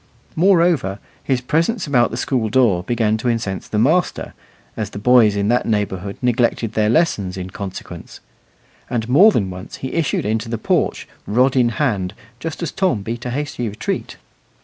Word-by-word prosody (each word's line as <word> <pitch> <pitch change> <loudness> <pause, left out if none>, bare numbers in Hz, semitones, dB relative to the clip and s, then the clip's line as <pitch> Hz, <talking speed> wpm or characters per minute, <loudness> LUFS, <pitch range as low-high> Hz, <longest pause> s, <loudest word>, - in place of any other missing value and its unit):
Moreover, 170 - +3 0.3
his 130 -2 0
presence 170 - 0
about 125 -5 +3
the 115 - -5
school 125 -3 -1
door 110 -7 +3
began 110 +1 0
to 115 - -4
incense 110 -5 -2
the 105 - -3
master, 155 +11 +1 0.4
as 110 -2 -3
the 100 - -9
boys 110 -1 +5
in 100 0 0
that 120 +1 +1
neighbourhood 100 -3 -2
neglected 120 -2 +1
their 105 -1 +2
lessons 105 - +1
in 95 0 -6
consequence; 95 -1 -8 0.7
and 115 -2 -2
more 180 - +6
than 95 - -1
once 90 0 -8
he 130 - -6
issued 165 -10 0
into 110 +1 -1
the 115 - -2
porch, - - 0 0.2
rod 125 +5 +2
in 125 -2 +4
hand, 105 -9 -1 0.2
just 165 +1 -5
as 165 - -2
Tom 130 - 0
beat 120 +3 -5
a - - -2
hasty 130 -3 -3
retreat. 105 +2 -4
115 Hz, 170 wpm, -19 LUFS, 105-135 Hz, 0.7 s, more